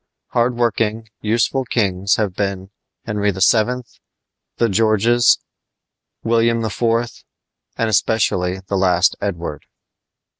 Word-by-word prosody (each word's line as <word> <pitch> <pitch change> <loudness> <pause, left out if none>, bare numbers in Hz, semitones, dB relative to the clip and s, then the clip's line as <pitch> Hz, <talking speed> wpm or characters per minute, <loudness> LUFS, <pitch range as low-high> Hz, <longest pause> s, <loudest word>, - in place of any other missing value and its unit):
Hard 120 +1 +1
working, 115 -1 -1
useful 115 +5 +1
kings 100 -5 0
have 105 -4 -1
been 95 0 -3 0.3
Henry 105 -2 -1
VII., 110 +6 +2 0.7
the 115 - +2
Georges, 115 +3 +3 0.9
William 115 0 +1
IV., 110 +2 -5 0.9
and 115 - 0
especially 95 -3 +1
the 95 +1 -3
last 90 -1 +3
Edward. 85 -7 -4
105 Hz, 100 wpm, -19 LUFS, 95-115 Hz, 0.9 s, Georges